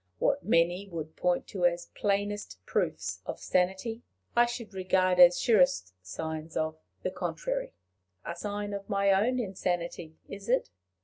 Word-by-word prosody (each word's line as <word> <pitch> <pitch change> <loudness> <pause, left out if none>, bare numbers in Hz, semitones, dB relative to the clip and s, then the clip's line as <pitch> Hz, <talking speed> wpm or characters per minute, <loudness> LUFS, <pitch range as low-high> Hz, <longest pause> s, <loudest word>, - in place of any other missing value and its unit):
What 280 0 +1
many 175 +1 +2
would 160 -2 -6
point 180 -1 +1
to 185 -3 -4
as 175 0 -3
plainest 205 +1 -1
proofs - - -1
of - - -4
sanity, 190 +6 0 0.3
I 240 0 +6
should 235 -3 -6
regard 185 -1 +2
as 175 0 +8
surest 180 - +3
signs 160 - -5
of 155 0 -1 0.2
the - - -1
contrary. - - -3 0.5
A - - -4
sign 205 0 -4
of 200 +1 -6
my 200 -1 +3
own 220 +7 +3
insanity 175 -6 -3
is 200 +2 -8
it? 255 - +2
190 Hz, 145 wpm, -29 LUFS, 175-205 Hz, 0.5 s, as